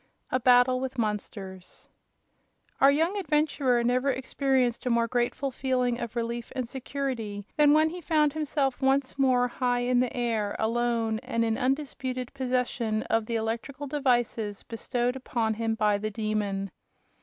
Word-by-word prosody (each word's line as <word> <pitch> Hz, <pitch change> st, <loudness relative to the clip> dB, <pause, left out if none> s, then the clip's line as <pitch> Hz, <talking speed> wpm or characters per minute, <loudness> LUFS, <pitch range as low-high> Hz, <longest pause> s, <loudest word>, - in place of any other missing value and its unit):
A 255 Hz, -, +2 dB
Battle 250 Hz, +1 st, +5 dB
with 260 Hz, 0 st, -4 dB
Monsters 200 Hz, -4 st, -5 dB, 0.9 s
Our 275 Hz, -, +7 dB
young 325 Hz, +8 st, +2 dB
adventurer 295 Hz, -7 st, +1 dB
never 250 Hz, +3 st, +2 dB
experienced 260 Hz, -2 st, 0 dB
a -, -, +2 dB
more 235 Hz, -1 st, +2 dB
grateful 245 Hz, +3 st, -1 dB
feeling 250 Hz, -2 st, 0 dB
of 235 Hz, -1 st, -5 dB
relief 235 Hz, 0 st, -3 dB
and 255 Hz, -2 st, -2 dB
security 245 Hz, -6 st, -4 dB
than 295 Hz, -1 st, +5 dB
when 310 Hz, +1 st, +5 dB
he 355 Hz, +1 st, -7 dB
found 300 Hz, -3 st, +2 dB
himself 290 Hz, -4 st, -1 dB
once 270 Hz, 0 st, +1 dB
more 255 Hz, -2 st, +3 dB
high 245 Hz, 0 st, 0 dB
in 245 Hz, 0 st, +2 dB
the 250 Hz, 0 st, -1 dB
air, 225 Hz, -4 st, -1 dB
alone, 230 Hz, -1 st, 0 dB
and 230 Hz, -2 st, -1 dB
in 225 Hz, -1 st, +1 dB
undisputed 260 Hz, -1 st, -2 dB
possession 250 Hz, -4 st, -1 dB
of 225 Hz, -1 st, +1 dB
the 235 Hz, -, -2 dB
electrical 230 Hz, +6 st, -3 dB
devices 240 Hz, -7 st, 0 dB
bestowed 240 Hz, +2 st, -2 dB
upon 235 Hz, -4 st, -1 dB
him 225 Hz, 0 st, -1 dB
by 210 Hz, -2 st, +2 dB
the 215 Hz, +1 st, -2 dB
Demon. 210 Hz, -3 st, -2 dB
245 Hz, 150 wpm, -27 LUFS, 225-265 Hz, 0.9 s, Our